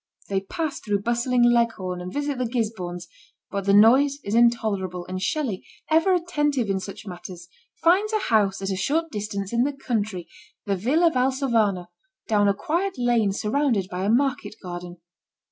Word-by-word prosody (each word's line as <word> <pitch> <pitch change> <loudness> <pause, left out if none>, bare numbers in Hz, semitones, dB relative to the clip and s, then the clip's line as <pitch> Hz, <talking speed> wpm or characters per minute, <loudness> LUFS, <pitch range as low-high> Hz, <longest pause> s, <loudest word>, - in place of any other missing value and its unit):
They 195 -1 0
pass 310 - -4
through 205 -2 -2
bustling 240 +2 +1
Leghorn, 225 -7 +1
and 180 +1 -6
visit 285 0 -2
the 250 - 0
Gisbornes, 190 -7 -3 0.4
but 200 -1 -3
the 200 - +3
noise 265 +7 +6
is 200 - -4
intolerable, 210 -6 +1
and 185 0 -5
Shelley, 260 - -2 0.3
ever 330 +4 +4
attentive 295 - 0
in 190 - 0
such 195 +2 -8
matters, 175 -1 -9 0.4
finds 385 +6 +4
a 435 - +2
house 205 - +1
at 195 - -1
a - - -1
short 315 - -1
distance 200 -1 -4
in 235 - +2
the 285 +3 +1
country, 215 -9 -3 0.4
the 200 - 0
Villa 300 - +2
Valsovano, 250 - +1 0.4
down 205 -2 +3
a 200 - +2
quiet 350 - -2
lane 240 -4 +2
surrounded 215 -2 0
by 180 +1 -3
a 200 - 0
market 240 -3 +1
garden. 175 -1 -7
220 Hz, 165 wpm, -24 LUFS, 195-275 Hz, 0.4 s, noise